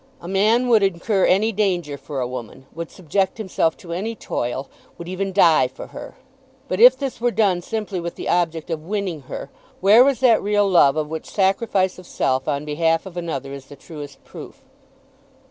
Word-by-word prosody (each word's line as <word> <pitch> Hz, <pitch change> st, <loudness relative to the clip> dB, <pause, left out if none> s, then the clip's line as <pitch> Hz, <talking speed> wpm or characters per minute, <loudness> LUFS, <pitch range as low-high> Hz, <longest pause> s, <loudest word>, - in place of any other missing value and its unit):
A 170 Hz, -, -10 dB
man 215 Hz, +6 st, +2 dB
would 230 Hz, -3 st, +5 dB
incur 195 Hz, +1 st, +1 dB
any 210 Hz, +4 st, +3 dB
danger 180 Hz, -8 st, -1 dB
for 140 Hz, 0 st, -6 dB
a 125 Hz, -, -1 dB
woman, 125 Hz, +1 st, -8 dB
would 165 Hz, 0 st, -6 dB
subject 190 Hz, +3 st, -1 dB
himself 185 Hz, -6 st, -1 dB
to 170 Hz, -2 st, -8 dB
any 215 Hz, +6 st, -3 dB
toil, 130 Hz, -, -4 dB, 0.3 s
would 170 Hz, -, -8 dB
even 190 Hz, +2 st, -3 dB
die 165 Hz, -8 st, +5 dB
for 130 Hz, -, -10 dB
her! -, -, -9 dB, 0.5 s
But 185 Hz, -, -2 dB
if 250 Hz, +3 st, +8 dB
this 265 Hz, -4 st, -5 dB
were 245 Hz, -, +3 dB
done 200 Hz, -6 st, +1 dB
simply 210 Hz, -1 st, -4 dB
with 170 Hz, 0 st, -5 dB
the -, -, -6 dB
object 165 Hz, -2 st, 0 dB
of 160 Hz, -2 st, -2 dB
winning 195 Hz, -6 st, -3 dB
her, 140 Hz, -, -7 dB, 0.3 s
where 210 Hz, +6 st, +7 dB
was 270 Hz, -3 st, +2 dB
that 240 Hz, -4 st, +5 dB
real 205 Hz, 0 st, +2 dB
love 160 Hz, -7 st, +5 dB
of 155 Hz, -1 st, -1 dB
which 160 Hz, +1 st, -6 dB
sacrifice 190 Hz, -1 st, +1 dB
of 180 Hz, -, -13 dB
self 130 Hz, 0 st, -1 dB
on 145 Hz, +1 st, -1 dB
behalf 165 Hz, +3 st, 0 dB
of 190 Hz, -2 st, -10 dB
another 140 Hz, -6 st, -4 dB
is 140 Hz, -1 st, -9 dB
the 145 Hz, -, -13 dB
truest 145 Hz, 0 st, -11 dB
proof? -, -, -12 dB
180 Hz, 195 wpm, -21 LUFS, 155-205 Hz, 0.5 s, if